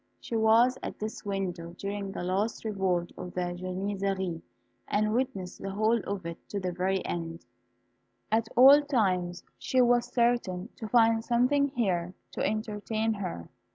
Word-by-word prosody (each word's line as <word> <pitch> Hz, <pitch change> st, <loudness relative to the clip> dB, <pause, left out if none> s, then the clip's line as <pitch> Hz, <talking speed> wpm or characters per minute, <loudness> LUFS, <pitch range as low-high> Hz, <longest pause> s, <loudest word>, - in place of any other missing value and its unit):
She 235 Hz, -, -5 dB
was 225 Hz, +3 st, +4 dB
at -, -, -6 dB
this 215 Hz, +1 st, -5 dB
window 180 Hz, -4 st, -3 dB
during 200 Hz, 0 st, -4 dB
the -, -, -5 dB
last 195 Hz, +6 st, -1 dB
revolt 190 Hz, -5 st, 0 dB
of 180 Hz, -1 st, -7 dB
the 180 Hz, -1 st, -1 dB
Janizaries, 190 Hz, -1 st, -2 dB, 0.5 s
and 215 Hz, +1 st, +1 dB
witnessed 205 Hz, -7 st, -2 dB
the 195 Hz, -, -4 dB
whole 215 Hz, +4 st, +2 dB
of 200 Hz, -3 st, -3 dB
it 170 Hz, 0 st, -5 dB
to 205 Hz, -, -2 dB
the 185 Hz, -1 st, -2 dB
very 185 Hz, +2 st, -1 dB
end. 165 Hz, -1 st, -4 dB, 0.9 s
At 225 Hz, +1 st, +2 dB
all 275 Hz, +4 st, +9 dB
times 185 Hz, -11 st, 0 dB, 0.2 s
she 260 Hz, -, 0 dB
was 245 Hz, -1 st, +3 dB
certain 235 Hz, -5 st, +1 dB
to 220 Hz, -, -5 dB
find 225 Hz, 0 st, +4 dB
something 255 Hz, +4 st, +3 dB
here 185 Hz, -9 st, -1 dB, 0.2 s
to -, -, -3 dB
entertain 215 Hz, +1 st, -1 dB
her. 180 Hz, -, -5 dB
200 Hz, 155 wpm, -29 LUFS, 180-230 Hz, 0.9 s, all